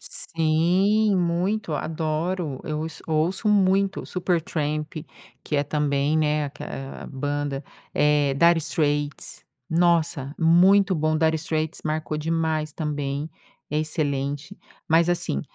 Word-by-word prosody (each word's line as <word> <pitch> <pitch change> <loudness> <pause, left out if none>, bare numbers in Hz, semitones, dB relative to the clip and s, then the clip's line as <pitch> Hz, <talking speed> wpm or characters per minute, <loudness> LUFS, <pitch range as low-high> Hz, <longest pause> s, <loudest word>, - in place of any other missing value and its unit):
Sim! 180 +7 +2
Muito! 175 +2 0
Adoro! 155 0 -2
Eu 155 -1 -3
ouço 160 -1 -6
ouço 165 +7 0
muito 195 -1 +3
o - - -10
Supertramp, 160 -4 -1 0.5
que 150 - -2
é 145 - +3
também, 145 +1 +1
né, 150 -1 +1
aque 140 - -8
eh, 135 0 -6
a - - -8
banda, 145 0 -3 0.3
eh, 145 -2 +3
Dire 170 +3 +5
Straits. 145 -2 -2 0.3
Nossa! 165 -4 +2
Muito 185 +4 +5
bom! 155 -1 +1
Dire 160 0 +2
Straits 155 0 -2
marcou 155 0 -2
demais 160 -1 -1
também, 145 -1 -3 0.4
é 150 - 0
excelente. 145 +2 -2 0.3
Mas, 165 +2 +4
assim, 175 - 0
155 Hz, 125 wpm, -24 LUFS, 145-170 Hz, 0.5 s, Dire